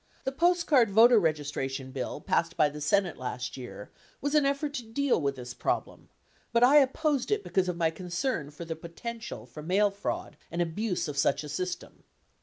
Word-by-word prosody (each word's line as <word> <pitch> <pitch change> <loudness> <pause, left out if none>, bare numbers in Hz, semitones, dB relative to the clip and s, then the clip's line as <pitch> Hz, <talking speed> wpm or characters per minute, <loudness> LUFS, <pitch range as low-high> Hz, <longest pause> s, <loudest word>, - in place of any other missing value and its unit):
The 265 - -1
postcard 320 - +3
voter 225 +2 +7
registra 145 -4 -1
tion 135 -1 -6
bill 130 -2 -4
passed 165 0 0
by 150 -1 +4
the 150 +1 -8
Senate 180 +4 +1
last 125 -2 -4
year 125 -5 -9 0.3
rvas 285 +1 0
an 295 -2 +4
effort 280 +1 -1
to 250 - -4
deal 240 - 0
with 140 -1 0
this 125 -1 -7
problem, - - -3 0.4
but 235 +1 +3
I 275 +4 +7
opposed 285 0 +2
it 420 -1 +1
because 185 -1 0
of 175 - -3
my 165 -1 +2
concern 180 - -2
for 150 +3 -9
the 165 0 -4
potential 170 - -7
for 125 +5 -10
mail 195 +6 +2
fraud 200 +1 -4
and 170 - -4
abuse 180 +4 -1
of 145 -1 -3
such 140 +1 +2
a 150 - -7
system. 175 +4 -5
180 Hz, 195 wpm, -29 LUFS, 150-245 Hz, 0.4 s, voter